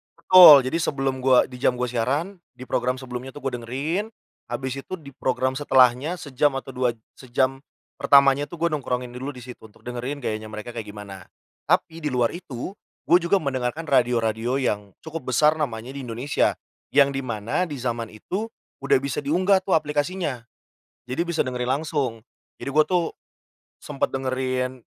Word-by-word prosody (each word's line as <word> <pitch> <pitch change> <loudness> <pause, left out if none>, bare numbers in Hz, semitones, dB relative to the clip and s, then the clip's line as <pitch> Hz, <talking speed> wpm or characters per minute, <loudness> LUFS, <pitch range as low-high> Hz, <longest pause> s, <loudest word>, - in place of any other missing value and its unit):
betul, 160 -7 +9
jadi 130 +6 -1
sebelum 135 -4 -1
gua 130 -1 +5
di 125 -1 -10
jam 125 - +2
gua 125 0 -2
siaran 145 - -1 0.2
di 130 - -9
program 125 0 -1
sebelumnya 130 0 -7
tuh 145 - -10
gua 135 - -1
dengerin 145 - -2 0.4
abis 130 +3 -4
itu - - -8
di 155 -6 -7
program 130 0 -1
setelahnya 135 +2 +3
sejam 140 0 +1
atau 135 0 -5
dua 125 -2 0 0.2
sejam 130 +1 0 0.4
pertamanya 140 0 +5
tuh 170 -1 -11
gua 170 - +3
nongkrongin 125 -4 -2
dulu 130 +4 -6
di 125 - -11
situ 125 -1 -10
untuk 105 - -23
dengerin 125 +4 -5
gayanya 110 0 -3
mereka 110 +2 -7
kayak 115 -2 -6
gimana. 100 -2 -9 0.4
Tapi 160 - +1
di 155 -2 -3
luar 120 -2 +2
itu, 165 -4 -6 0.4
gue 175 - +8
juga 175 +2 +1
mendengarkan 140 +3 -3
radio-radio 120 0 +1
yang 105 -5 -2
cukup 160 -5 -5
besar 155 +3 +4
namanya 120 -6 -3
di 135 -2 -6
Indonesia. 120 +5 0 0.4
Yang 140 -1 +6
di - - -1
mana 115 - -1
di 155 - -7
zaman 120 -2 -2
itu 185 - -4 0.4
udah 140 - +5
bisa 140 -2 -3
diunggah 185 +5 +2
tuh 190 - +1
aplikasinya. 150 -3 -1 0.6
Jadi 125 +6 -3
bisa 170 -1 +1
dengerin 125 -1 -3
langsung. 135 -8 -2 0.3
Jadi - - -6
gue 155 +2 +5
tuh 180 -2 +1 0.7
sempet 145 -2 -2
dengerin, 130 -1 -2
130 Hz, 170 wpm, -24 LUFS, 125-150 Hz, 0.7 s, betul